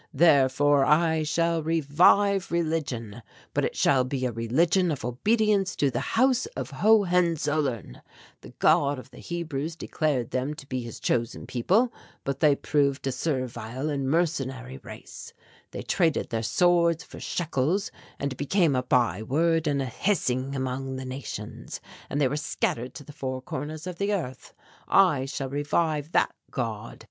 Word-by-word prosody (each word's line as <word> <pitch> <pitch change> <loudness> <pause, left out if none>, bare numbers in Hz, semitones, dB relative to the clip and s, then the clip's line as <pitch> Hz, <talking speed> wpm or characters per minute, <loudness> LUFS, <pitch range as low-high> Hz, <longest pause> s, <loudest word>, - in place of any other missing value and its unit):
Therefore 145 -2 +4
I 160 +2 +3
shall 165 +2 +1
revive 170 +6 +3
religion, 145 -10 -2 0.3
but - - +1
it - - -1
shall 130 -2 +4
be 130 0 -2
a 125 - 0
religion 160 - +2
of 145 -7 -3
obedience 200 - +1
to 140 -2 +1
the - - -1
House 255 - +2
of - - -5
Hohenzollern. 170 - +1 0.4
The - - -11
God 140 0 +3
of 130 +1 -11
the - - -13
Hebrews 160 -2 -4
declared 150 -7 -1
them 130 +4 -2
to 150 -2 -11
be 130 -2 -3
his 115 -2 -8
chosen 115 0 -1
people. 210 - +1 0.3
But 140 -1 -3
they 150 -3 +5
proved 140 -1 0
a 135 - 0
servile 130 -1 -3
and 140 -2 -1
mercenary 135 -5 -1
race. 110 -3 -11 0.4
They - - -6
traded 165 -4 +1
their 115 -1 -1
swords 170 +5 +3
for - - -12
shekels 170 +4 -1 0.3
and 140 -1 -2
became 155 0 +2
a 125 - +2
byword 130 - +1
and 140 -2 +1
a - - -3
hissing 130 - -1
among 130 0 -3
the 130 0 -5
nations 130 -1 -6 0.3
and 145 - -2
they 140 - +4
were 145 +4 -2
scattered 125 -4 -2
to 145 - -8
the 145 - -12
four 130 -2 -4
corners 150 +5 -6
of 180 -2 -6
the 200 +1 +1
earth. 130 -9 -6 0.3
I 160 -9 +4
shall 135 -1 -4
revive 145 +2 -1
that - - +3 0.2
God. 115 -3 -4
145 Hz, 155 wpm, -26 LUFS, 130-170 Hz, 0.4 s, they